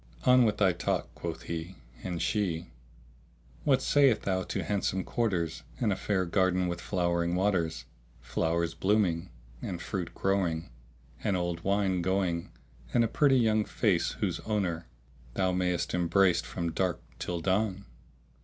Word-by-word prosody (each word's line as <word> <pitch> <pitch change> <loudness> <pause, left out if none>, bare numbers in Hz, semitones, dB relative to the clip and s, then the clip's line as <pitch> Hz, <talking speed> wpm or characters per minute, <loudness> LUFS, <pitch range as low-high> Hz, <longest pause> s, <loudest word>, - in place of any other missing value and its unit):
"On 125 -1 +6
with 105 -1 +1
thy 95 -3 +4
talk," - - -2
quoth 80 -1 -5
he; 85 +2 -5 0.3
and 90 -2 -3
she, 90 -6 0 1.0
"What 135 -3 +3
sayest 135 -6 +4
thou 95 -1 0
to - - -3
handsome 95 -2 -1
quarters 90 -9 -1 0.2
and 110 -6 +2
a - - -2
fair 95 -2 0
garden 90 0 +2
with 85 0 -3
flowing 85 -2 0
waters, 90 -10 0 0.3
flowers 80 +7 -1
blooming, 95 -4 +1 0.3
and 90 - -4
fruit 90 0 -4
growing, 90 -8 0 0.5
and 100 -4 +1
old 85 -1 -2
wine 95 -2 +1
going 90 -2 0 0.5
and 120 - +5
a - - +2
pretty 135 +2 +4
young 110 -3 +3
face - - +1
whose - - -2
owner 95 -6 -2 0.5
thou 95 -1 +2
mayest 90 -1 0
embrace 90 0 +3
from 85 -2 -3
dark 90 0 0 0.2
till 90 -1 -3
dawn? 95 +2 0
95 Hz, 145 wpm, -29 LUFS, 85-100 Hz, 1.0 s, On